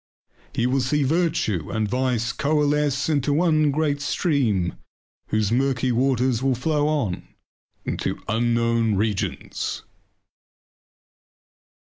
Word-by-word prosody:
He 120 - -1
will 130 +2 +1
see 145 +3 +1
virtue 145 - 0
and 110 -2 -1
vice 125 -1 0
coalesce 145 -2 +1
in 150 -3 +2
one 155 -2 +3
great 145 0 0
stream 125 - 0 0.5
whose 110 -1 0
murky 130 +1 +1
waters 125 -1 +1
will 135 -1 +1
flow 150 +4 0
on 135 -13 -1 0.6
into - - -2
unknown 115 -1 +1
regions. 105 -1 -2
130 Hz, 100 wpm, -23 LUFS, 115-145 Hz, 0.6 s, one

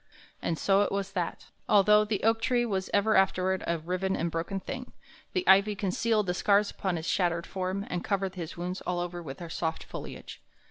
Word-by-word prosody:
And 165 - -1
so 195 +3 +3
it 205 - +1
was 195 -1 -2
that, 180 -3 -4 0.2
although 210 +1 +6
the 210 -2 -2
oak 225 +1 +3
tree 240 0 +2
was 190 -4 -2
ever 210 +2 +3
afterward 190 0 +2
a 170 - +1
riven 185 +4 -2
and 170 +1 -1
broken 170 +4 -2
thing, 250 +5 -7 0.4
the 370 -1 -1
ivy 200 +2 +6
concealed 210 +3 +1
the 180 - 0
scars 200 +3 +3
upon 190 -3 -2
his 160 -1 -4
shattered 170 -3 +1
form 190 +1 -3
and 180 - -3
covered 195 -2 -1
his 170 -3 -6
wounds 180 +2 -4
all 180 -1 -2
over 175 0 -4
with 135 -5 -7
her 170 - -7
soft 160 -1 -2
foliage. - - -8
190 Hz, 200 wpm, -29 LUFS, 175-205 Hz, 0.4 s, although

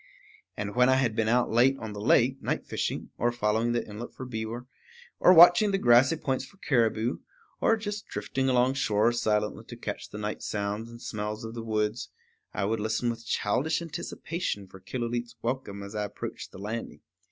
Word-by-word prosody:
And 105 0 -3
when 125 +1 +4
I 130 - +5
had 125 -4 +1
been 110 -1 +1
out 120 +2 +2
late 125 +4 +4
on 110 -4 -6
the 105 - -6
lake, 125 +4 +3
night - - -2
fishing, - - -3
or 120 +1 +2
following 115 0 +1
the 120 - -1
inlet 105 +3 -8
for 130 - -6
beaver, 115 0 -5 0.5
or - - +7
watching 175 +4 +8
the 195 - +2
grassy 125 0 +5
points 135 -5 -2
for 195 - -14
caribou, 115 - +1 0.4
or 225 - +3
just 210 -1 -5
drifting 135 0 -2
along 125 +1 +3
shore 110 -4 +2
silently 105 -3 0
to - - -9
catch - - -5
the - - -8
night 105 0 -4
sounds 105 +2 -3
and 115 0 -11
smells 105 0 -4
of 110 - -6
the 115 - -5
woods, 110 0 -1 0.4
I - - -2
would 110 +2 0
listen 110 +3 0
with 115 0 -9
childish 130 +10 +1
anticipation 165 - -4
for 95 0 -14
Killooleet's 120 +3 -4
welcome 115 -5 -3
as 100 +1 -8
I 105 -1 -1
approached 105 - -7
the - - -11
landing. 110 +4 -5
115 Hz, 190 wpm, -28 LUFS, 105-130 Hz, 0.5 s, watching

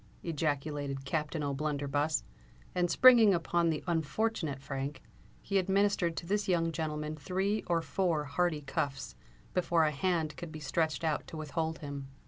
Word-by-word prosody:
ejaculated 145 -3 -2
Captain 150 +1 -2
O'Blunderbuss; 145 +1 0 0.5
and 175 -1 +1
springing 230 0 +7
upon 170 0 +1
the 155 -2 -1
unfortunate 165 -2 -1
Frank, 135 +1 -5 0.4
he 195 -1 +1
administered 190 -3 +1
to - - -4
this 205 +3 0
young 165 -3 +2
gentleman 155 -1 -3
three 190 +6 -1
or 170 -1 +1
four 170 -4 0
hearty 155 +2 0
cuffs, 135 - -3 0.4
before 170 -2 +2
a 155 - +3
hand 160 0 0
could 170 -2 -7
be 155 - -7
stretched 155 +3 -1
out 155 -2 0
to 160 - -8
withhold 160 +1 -2
him. 140 -1 -6
160 Hz, 145 wpm, -32 LUFS, 145-175 Hz, 0.5 s, springing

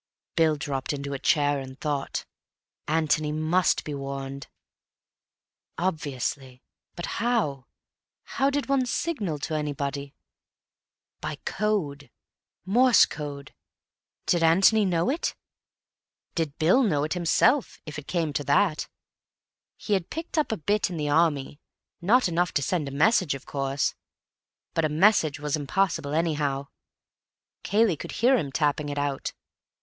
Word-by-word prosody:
Bill 160 -2 +4
dropped 140 -1 -3
into 140 0 -4
a 135 - -4
chair 145 -2 +2
and 130 0 -9
thought. 145 -3 -2 0.6
Antony 155 -1 +1
must 155 +4 +2
be 150 - -5
warned. 140 0 -5 1.3
Obviously. 140 -6 -3 0.3
But 175 - -4 0.2
how? 205 - 0 0.6
How 275 +1 0
did 285 0 -1
one 270 -2 +2
signal 220 - -2
to 145 +2 -4
anybody? 140 -2 -3 1.0
By 155 0 -4
code. 160 - -1 0.6
Morse 245 +5 +6
code. 140 -2 -7 0.7
Did 175 - +2
Antony 195 +6 +5
know 175 +4 +1
it? 320 - -2 1.0
Did 160 -4 -2
Bill 175 +12 +4
know 155 - +2
it 155 - -1
himself, 220 - +2
if 150 -1 -6
it 145 - -13
came 165 -4 -1
to 145 -1 -1
that? 155 +2 +2 0.9
He 210 - -2
had 190 -4 0
picked 325 +2 -6
up 310 -6 +1
a 220 - -1
bit 205 +5 +1
in 175 - -5
the 150 -1 -1
Army—not 165 - 0
enough 175 0 0
to 140 - +2
send 160 -1 -1
a - - -5
message, 170 +1 +3
of 135 - -10
course. 135 0 -1 0.8
But 165 - +1
a 155 - +2
message 155 -3 +3
was 150 0 -1
impossible, 150 -1 0
anyhow; 145 -4 0 0.9
Cayley 205 -5 +2
would - - -7
hear 255 +4 +4
him 145 - -1
tapping 145 0 0
it 145 - -4
out. 145 -1 -2
155 Hz, 135 wpm, -26 LUFS, 145-190 Hz, 1.3 s, Morse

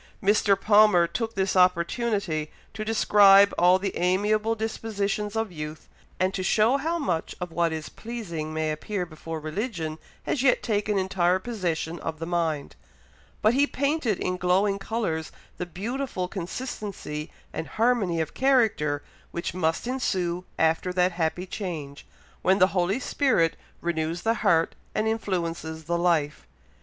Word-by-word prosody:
Mr. 200 -1 +3
Palmer 210 -4 +5
took 225 +5 -3
this 190 -1 0
opportunity 180 -2 +1 0.2
to 215 - -4
describe 200 -2 +6
all 180 +1 +5
the 195 0 -3
amiable 210 +5 +1
dispositions 210 -1 -2
of 225 -3 -1
youth, 155 -1 -7 0.3
and 185 +1 +1
to 195 - -2
show 220 +7 +3
how 325 +5 -1
much 180 - -2
of 180 -1 -5
what 170 0 +1
is 160 -1 -4
pleasing 180 -10 -6
may 155 0 -1
appear 180 +5 -3
before 160 0 -7
religion 160 -1 -4 0.2
has 265 - -1
yet 260 -1 +3
taken 210 -1 0
entire 185 -1 +2
possession 175 -6 -3
of 160 -1 -4
the 165 - -5
mind; 165 -4 -1 0.7
but 215 +2 +5
he 280 +3 +3
painted 280 - 0
in 180 0 -2
glowing 190 +3 +2
colours 195 -7 -2 0.3
the 180 - -4
beautiful 205 - -3
consistency 190 -5 -5 0.2
and - - -4
harmony 220 -7 +2
of 160 - -2
character 220 - +2 0.3
which 170 - -4
must 165 0 0
ensue 185 -9 -1
after 160 +3 +2
that 180 0 +2
happy 170 +1 -1
change, 160 -8 -6 0.3
when 190 +1 +3
the 185 0 +5
Holy 190 +5 +1
Spirit 240 - +2 0.3
renews 170 0 -2
the 225 - +3
heart 165 -6 +3 0.2
and 215 - +1
influences 170 -7 -2
the 170 +2 -1
life. 170 -4 0
185 Hz, 145 wpm, -26 LUFS, 165-215 Hz, 0.7 s, describe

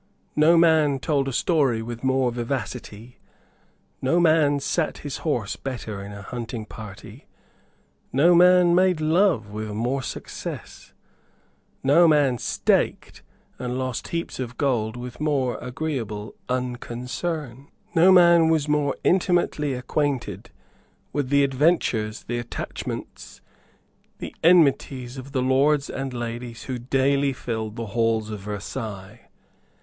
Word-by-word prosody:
No 160 +3 +5
man 160 -4 +4
told 135 0 0
a - - -1
story 130 -5 +1
with 120 +1 -7
more 130 -1 +2
vivacity; 120 -2 -5 0.8
no 135 +7 +2
man 155 -4 +4
sate 155 +3 -1
his 145 - -4
horse 125 -11 -2
better 110 -7 -6
in 100 - -8
a 100 -1 -9
hunting 115 0 -6
party; 105 -3 -11 0.8
no 160 +7 +5
man 180 0 +6
made 180 -1 +3
love 155 - +2
with 110 +1 -5
more 125 +5 -1
success; - - -7 0.9
no 155 +6 +6
man 145 -6 +3
staked - - 0 0.4
and 125 0 -3
lost 130 -2 -3
heaps 170 -4 -4
of 125 -1 -5
gold 120 -5 0
with 125 0 -8
more 140 -5 0
agreeable 125 -6 -4 0.2
unconcern; 125 +3 -4 0.3
no 175 +3 +6
man 170 -3 +6
was 155 -2 +1
more 150 -2 +1
intimately 175 -6 +1
acquainted 135 +1 -2 0.6
with 145 -3 -1
the 140 0 +4
adventures, 130 -6 +1
the 120 0 -3
attachments, 120 - -7 0.8
the - - -8
enmities 140 -6 +3
of 130 +1 -9
the 130 -2 0
lords 140 +2 +2
and 135 0 -4
ladies 120 -1 -6
who 130 -2 -4
daily 135 +2 +1
filled 110 -4 -4
the 115 -1 -4
halls 115 -2 +1
of 105 - -5
Versailles. 105 0 -7
130 Hz, 125 wpm, -24 LUFS, 120-150 Hz, 0.9 s, man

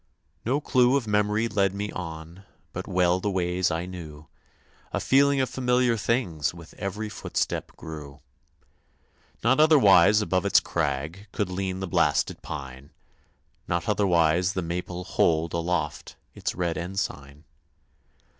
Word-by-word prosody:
No 130 +5 +1
clue 130 -2 +3
of 130 - -3
memory 105 +1 +1
led 100 -3 +1
me 105 +1 -3
on, 80 0 -7 0.3
But - - -5
well 90 0 +2
the 105 - -1
ways 90 -1 0
I 85 +1 -2
knew; 80 -5 -9 0.7
A - - -1
feeling 140 +1 +3
of 130 - +2
familiar 125 -2 +1
things 100 - -1
With 85 -2 -12
every 105 +2 -3
footstep 105 - -3
grew. 75 -3 -9 1.2
Not 130 +5 +3
otherwise 105 - +6
above 95 -4 0
its - - +5
crag 75 +9 -3
Could 100 -5 -2
lean 95 0 -3
the 95 - -3
blasted 85 -5 +1
pine; 65 +1 -8 0.8
Not 85 +5 -1
otherwise 90 -3 +2
the 95 - -2
maple 90 +1 -4
hold 80 -3 +1
Aloft 85 0 -2 0.2
its - - -4
red 85 -2 -1
ensign. 75 -6 -5
90 Hz, 135 wpm, -26 LUFS, 85-105 Hz, 1.2 s, otherwise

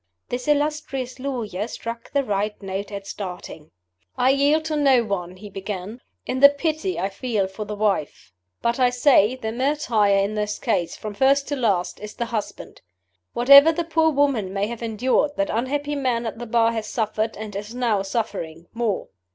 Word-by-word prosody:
This 245 +2 -4
illustrious 290 -4 -1
lawyer 230 -7 -3
struck 230 0 -7
the 280 -1 +1
right 210 -2 -2
note 195 +1 -5
at 200 -1 -6
starting. 180 -6 -7 0.5
"I 255 +1 +4
yield 290 +3 +2
to 315 -1 -1
no 270 -5 +4
one," 185 -4 -4
he 205 +3 -10
began, 200 +3 -6 0.2
"in 260 - -2
the 280 +1 +10
pity 315 +5 -2
I 195 - 0
feel 215 -1 -1
for 195 +3 -6
the 210 +1 -5
wife. 205 - -2 0.3
But 235 +2 +1
I 250 -1 +5
say, 250 -2 +4
the 220 -4 -4
martyr 250 -4 +1
in 200 +1 +2
this 210 -1 -2
case, 170 -2 -1
from 215 -1 -6
first 275 +5 +3
to 290 - 0
last, 205 -9 0
is 210 0 -8
the 235 - -2
husband. 230 -3 -5 0.5
Whatever 280 +6 +8
the 340 +1 -2
poor 325 -1 +2
woman 275 -10 +1
may 195 +1 0
have 235 +2 -6
endured, 250 +6 0
that 295 0 0
unhappy 285 +6 -1
man 250 -4 -1
at 225 0 -5
the 240 - -6
Bar 230 0 +3
has 220 -2 -4
suffered, 220 0 -2
and 210 -1 -7
is 210 +4 -6
now 235 -5 +1
suffering, 195 -6 -4
more. 225 -4 -2
230 Hz, 185 wpm, -23 LUFS, 205-275 Hz, 0.5 s, the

